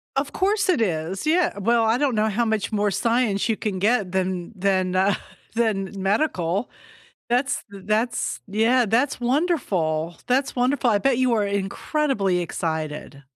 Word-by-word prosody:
Of 275 +1 -1
course 400 +1 +1
it 310 -10 +3
is. 180 - -2
Yeah, 340 - +2
well, 230 +3 +2
I 225 +2 +3
don't 270 -4 +1
know 215 +1 +2
how 235 +3 0
much 220 0 -1
more 205 -1 +1
science 230 0 +1
you 220 - +2
can 200 -3 -3
get 210 -2 +1
than 185 -1 -1
than, 185 -1 +1
uh, 190 +1 +3 0.4
than 215 -4 0
medical. 195 - 0 0.6
That's 250 +3 0
th 195 -2 -11
that's 220 +3 0
yeah, 225 +5 +2
that's 250 +5 +1
wonderful, 190 - 0
that's 265 +2 +1
wonderful. 250 0 +2
I 205 - +3
bet 260 +2 +1
you 255 -2 +2
are 210 -2 +1
incredibly 200 - 0
excited. 155 -4 -4
215 Hz, 155 wpm, -23 LUFS, 190-250 Hz, 0.6 s, it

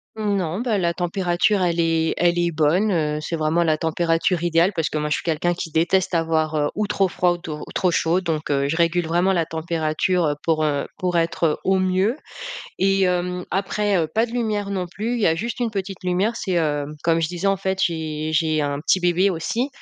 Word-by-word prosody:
Mmh, 210 -2 -1
non, 180 -1 -2
bah, 235 -4 0
la 170 -2 +1
température, 180 +2 +1
elle 175 -2 +1
est 165 -1 +2
elle 175 0 +2
est 170 0 +1
bonne, 165 +7 +2
heu, 150 -4 0
c'est 165 - -3
vraiment 160 +2 +1
la 155 -2 +2
température 165 +2 0
idéale 170 +2 +3
parce 165 -3 0
que - - -3
moi, 150 0 -1
je 150 - +2
suis - - -5
quelqu'un 170 +1 0
qui 170 - -5
déteste 175 +4 +1
avoir, 160 -1 +1
heu, 145 -1 +1
ou 210 0 -1
trop 200 -2 +1
froid 180 0 +1
ou 175 - -5
to 155 -3 -7
trop 180 - +2
chaud 170 +1 +2
donc 160 -3 -3
heu, 140 -1 +1
je 145 - -1
régule 170 0 +2
vraiment 175 +4 +2
la 170 -3 +1
température, 165 +2 -1
heu, 145 -1 0
pour, 160 -1 +1
heu, 145 -2 0
pour 180 -1 0
être, 165 +1 -2
heu, 155 - +1
au 190 0 +2
mieux 185 +5 +1 0.6
et 195 0 +2
hem, 180 0 0
après, 200 +2 0
heu, 165 -3 +1
pas 225 +2 +2
de 230 - -11
lumière 215 -4 -1
non 185 -2 -2
plus. 215 +7 -3
Il 240 - -2
y - - +3
a 160 - +1
juste 235 +8 -4
une 235 -2 0
petite 195 -2 -5
lumière, 185 +5 +1
c'est, 195 -4 -3
hem, 150 -3 -1
comme 165 -1 +3
je 160 - 0
disais, 175 +2 -3
en 195 0 +3
fait, 190 0 -2
j'ai 155 -2 -2
j'ai 155 0 +2
un 145 -1 -2
petit 185 +4 +2
bébé 180 +2 +3
aussi 225 - -2
175 Hz, 235 wpm, -22 LUFS, 160-190 Hz, 0.6 s, idéale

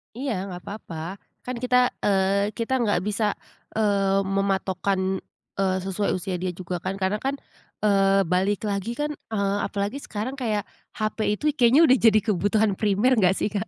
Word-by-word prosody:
Iya 265 +1 -3 0.2
enggak 180 -2 -7
apa-apa. 185 -3 -7 0.2
Kan 250 0 -4
kita, 250 0 +3
eee, 200 +1 +2
kita 255 +3 0
enggak 205 -6 +2
bisa, 210 0 0 0.4
eee, 200 -2 +2
mematokkan, 190 -1 0 0.4
eee, 190 -1 +2
sesuai 195 +2 -1
usia 185 0 -3
dia 180 0 -2
juga 180 0 -5
kan. 190 +3 -3
Karena 195 +2 0
kan, 275 +1 -1 0.5
eee, 195 -1 +4
balik 190 +4 +1
lagi 200 +4 -2
kan, 295 +2 -2 0.2
eee, 200 -1 0
apalagi 205 +6 -2
sekarang 235 +1 -5
kayak 220 -6 -1 0.3
HP 215 +1 -2 0.2
itu 300 - -8
kayaknya 255 +3 +5
udah 260 +1 +6
jadi 220 -2 +5
kebutuhan 210 +1 +2
primer 215 +5 +3
enggak 190 -2 +4
sih, - - -1
Kak? 200 -3 -2
200 Hz, 160 wpm, -25 LUFS, 190-220 Hz, 0.5 s, udah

